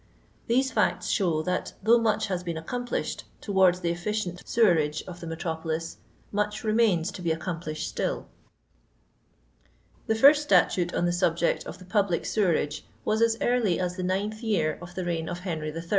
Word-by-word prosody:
These 260 +3 +2
fiuts - - +1
show 170 -7 +1
that 180 +1 -2
though 230 +3 +6
much 220 -1 +1
has 185 -2 -2
been 170 -2 -4
accomplished 245 +9 -3
towards 190 -3 +3
the 170 -1 0
efficient 180 0 -3
seweiage 160 -9 +2
of 175 -1 -8
the 170 - -7
metropolis, 165 0 -3 0.3
much 210 +1 -1
remains 215 -6 +2
to 185 - -9
be 170 - -1
accompEshed 160 -1 -3
stilL - - -2 1.8
The 220 - +2
first 285 +6 +7
statute 180 -11 +3
on - - +1
the 175 - +2
nlject 175 -1 +1
of - - -7
the 185 - -13
public 195 -3 +1
sewerage 155 -7 0 0.2
was 220 +1 +1
as 230 -1 +3
early 240 -8 +2
as 180 -1 -1
the 185 - -4
9th 200 +4 -2
jrear 175 -10 0
of 175 0 -10
the 185 - -3
reign 165 -2 -2
of 175 0 -5
Henry 160 -4 -3
III. 165 +2 -6
180 Hz, 170 wpm, -27 LUFS, 165-215 Hz, 1.8 s, first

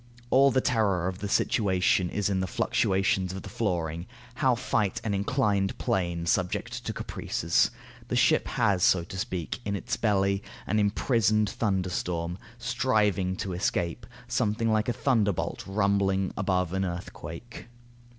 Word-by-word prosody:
All 135 +1 +6
the 130 0 +2
terror 100 -9 +1
of 95 0 -4
the 100 - -4
situation 95 -4 +2
is 105 +1 -1
in 95 -2 0
the 95 - -1
fluctuations 95 0 +1
of 95 - -6
the - - -8
flooring. 85 -5 -2 0.3
How 130 -1 +2
fight 105 -3 0
an 110 -2 -1
inclined 100 -1 +1
plane 85 -3 -1
subject 90 +1 -1
to - - 0
caprices? - - 0 0.4
The - - -2
ship - - +3
has, 105 -6 +1
so 90 -1 +4
to 90 - -9
speak, 90 -6 -3
in 100 0 -2
its 100 - -3
belly, 100 -2 +1 0.2
an 105 - +1
imprisoned 105 0 +2
thunderstorm, 90 -5 -2 0.2
striving 110 -6 +1
to 95 0 -4
escape; 85 -1 -1 0.2
something 110 +2 0
like 110 +2 +1
a - - +1
thunderbolt 110 -9 0
rumbling 95 -1 +1
above 90 -3 0
an 95 0 0
earthquake. 85 +5 -7
95 Hz, 145 wpm, -28 LUFS, 90-110 Hz, 0.4 s, All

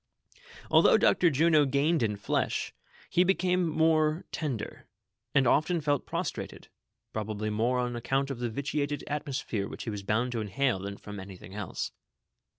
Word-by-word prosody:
Although - - +6
Dr. 175 - +4
Juno 155 +1 +4
gained 140 +4 +2
in 105 -3 +1
flesh, 100 - -1 0.3
he 180 - +3
became 180 -2 +2
more 155 0 +2
ten 145 -7 -2
der, 105 - -8 0.5
and 140 -1 +5
often 155 +7 +3
felt 145 -3 0
prostrated, - - -4 0.4
probably 110 0 -3
more 115 +4 +1
on 125 -1 -1
account 135 +3 0
of 130 - -5
the 120 -1 -1
vitiated 145 +4 -2
atmosphere 140 -8 -3
which - - -7
he 115 - -3
was 105 -1 -4
bound 110 +5 0
to 115 -2 -2
inhale 115 +1 0
than 100 +1 -6
from 105 -1 -8
anything 95 -1 -10
else. 105 -4 -4
130 Hz, 155 wpm, -29 LUFS, 110-155 Hz, 0.5 s, Although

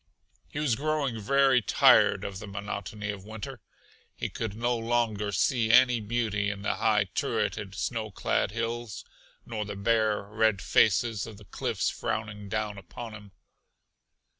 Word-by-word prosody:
He - - -8
was 150 -5 +1
growing 140 -4 -1
very 135 +3 +4
tired 105 - +5
of 95 -1 -5
the 105 - -8
monotony 100 +1 -5
of 100 -2 -8
winter; 110 0 -8 0.5
he - - -3
could 110 -3 -4
no 120 +2 0
longer 115 -3 0
see 110 +3 +2
any 125 0 +6
beauty 105 -2 -1
in 100 0 -5
the - - 0
high 105 -2 +3
turreted, 95 -1 -1
snow 110 +1 -2
clad 95 - 0
hills, 115 0 -4 0.4
nor 110 -2 -3
the 105 0 -6
bare, 110 0 +1
red 105 0 +1
faces 110 +2 +2
of 110 -3 -10
the 105 - -14
cliffs - - -1
frowning 105 -2 -4
down 105 -1 -2
upon 110 +5 -9
him. 105 -2 -11
110 Hz, 150 wpm, -28 LUFS, 105-115 Hz, 0.5 s, any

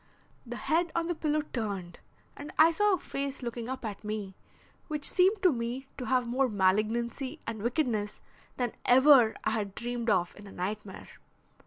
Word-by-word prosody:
The 240 - -5
head 330 +5 0
on 335 0 +1
the 345 - -1
pillow 305 -2 0
turned 195 -7 -4 0.4
and 290 +2 -8
I 320 +2 +7
saw 415 +3 +3
a - - -5
face 275 -4 -4
looking 235 0 -4
up 260 -2 -5
at 210 -1 -6
me 210 -2 -4 0.5
which 300 -2 -2
seemed 390 +3 +3
to 365 - +6
me 240 +3 -3
to 250 - -4
have 255 -1 +2
more 255 +2 +1
malignancy 225 +8 0
and 225 -2 -5
wickedness 230 -4 -1 0.4
than 245 -3 0
ever 255 -3 +6
I - - +1
had 205 -3 -2
dreamed 240 0 -3
of 180 -4 +1
in 205 0 -12
a - - -11
nightmare. 195 +2 -5
240 Hz, 175 wpm, -29 LUFS, 215-290 Hz, 0.5 s, I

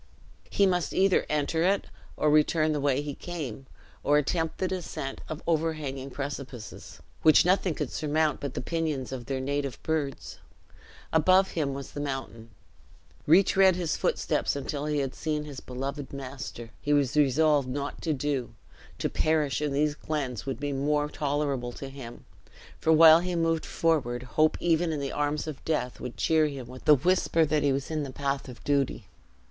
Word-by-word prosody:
He 200 - +3
must 180 -3 0
either 190 0 +3
enter 150 +2 0
it 195 +3 +2 0.3
or 150 - +2
return 155 +1 +3
the 150 - 0
way 140 0 +1
he 145 -1 -4
came, 135 -7 -6 0.4
or 145 +1 +4
attempt 160 +2 0
the 185 - 0
descent 175 -7 -5
of 155 +2 -6
overhanging 155 -5 -1
precipices, 135 -4 -7 0.2
which 155 +1 +6
nothing 180 -2 +2
could 150 -5 -3
surmount 155 0 0
but 140 -2 -5
the - - -2
pinions 155 -3 -2
of 125 -3 -6
their 135 -1 -2
native 140 -1 -2
birds. 150 -4 -3 0.7
Above 185 +4 +4
him 140 -4 -1
was 140 -1 -7
the - - -6
mountain. 135 -5 -5 0.8
Retread 190 +2 +5
his 175 -3 -1
footsteps - - 0
until 145 +1 -3
he 150 -1 0
had 135 -2 -1
seen 150 -1 -2
his 145 -3 -7
beloved 135 +2 -5
master, 130 -4 -7
he 145 - +1
was 140 -2 +2
resolved 145 0 +3
not 140 +2 -4
to 160 - -1
do 135 -5 -2 0.4
to - - -1
perish 155 -3 +1
in 150 -1 0
these 145 +2 +1
glens 140 -6 -4
would 135 - -3
be 145 0 -2
more 145 +2 0
tolerable 140 -5 -2
to 135 - -7
him; 130 -4 -10 0.5
for 160 - +2
while 160 0 +9
he 180 0 -2
moved 165 -1 0
forward, 130 -7 0
hope, 155 +5 +2
even 170 0 +2
in 155 - -2
the 140 -1 -3
arms 145 +1 -1
of 155 -3 -7
death, 150 -6 -2
would 125 - -7
cheer 160 -1 +3
him 135 -4 -6
with 125 +1 -12
the 150 - +8
whisper 165 +2 +2
that 150 0 +1
he 140 -1 +2
was 135 +3 -2
in 155 -1 -1
the 140 -2 -5
path 140 0 -2
of 125 - -11
duty. 140 -6 0
145 Hz, 175 wpm, -28 LUFS, 135-160 Hz, 0.8 s, while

